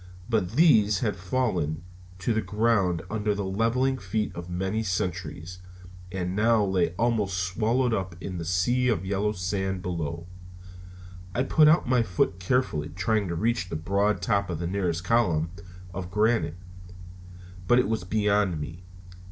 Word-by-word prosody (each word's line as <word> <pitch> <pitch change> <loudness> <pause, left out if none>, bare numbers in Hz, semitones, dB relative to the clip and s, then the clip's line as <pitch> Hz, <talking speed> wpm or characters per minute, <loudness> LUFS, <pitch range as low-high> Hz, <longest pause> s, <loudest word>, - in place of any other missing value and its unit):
But 105 -4 0
these 110 - +4
had 105 -4 0
fallen 90 - -1 0.3
to 100 +6 -1
the 110 - +1
ground 100 -4 +1
under 105 0 -1
the 100 - -2
leveling 115 +7 +1
feet 105 +2 -2
of 85 +1 -8
many 95 +5 -1
centuries, 90 -3 -3 0.5
and 90 0 -3
now 110 0 +3
lay 90 -3 0
almost 110 -5 +1
swallowed 110 +7 +1
up 95 -4 -2
in 95 -1 -5
the - - -4
sea 90 +10 +1
of 100 -7 0
yellow 100 +2 0
sands 95 -1 -2
below. 85 -2 -3 1.1
I 125 - +2
put 155 +2 +5
out 155 -1 +4
my 125 -1 +3
foot 90 -3 0
carefully, 90 - 0
trying 105 +5 0
to 85 - -3
reach 110 -1 0
the - - -4
broad 100 +4 0
top 100 -1 +1
of 85 - -2
the 85 - -4
nearest 90 -2 -1
column 90 -8 +2 0.4
of 90 0 -5
granite, 105 -4 +1 1.1
but 120 - +5
it 125 - +3
was 110 -4 -1
beyond 105 -3 +1
me. 80 +4 -7
95 Hz, 155 wpm, -26 LUFS, 90-110 Hz, 1.1 s, put